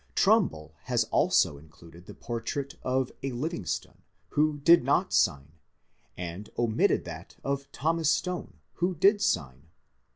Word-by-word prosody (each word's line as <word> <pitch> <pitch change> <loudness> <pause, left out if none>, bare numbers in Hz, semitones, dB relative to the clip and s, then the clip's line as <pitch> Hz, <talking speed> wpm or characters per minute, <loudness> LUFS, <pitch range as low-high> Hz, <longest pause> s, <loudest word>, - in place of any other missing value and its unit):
Trumbull 180 - +2
has - - +2
also 70 - +3
included 85 +3 -16
the - - -10
portrait 120 +4 -4
of 130 0 0
a 135 - -3
Livingston, 135 - -4 0.3
who 150 0 +1
did 165 +2 +6
not 155 +8 +1
sign, 70 -4 +2 0.7
and 90 +3 -6
omitted 115 -2 +2
that - - -9
of 140 0 -3
Thomas 160 +1 0
Stone, 175 - -2 0.2
who 180 +2 0
did 200 +6 +4
sign. 70 - -1
135 Hz, 130 wpm, -28 LUFS, -, 0.7 s, did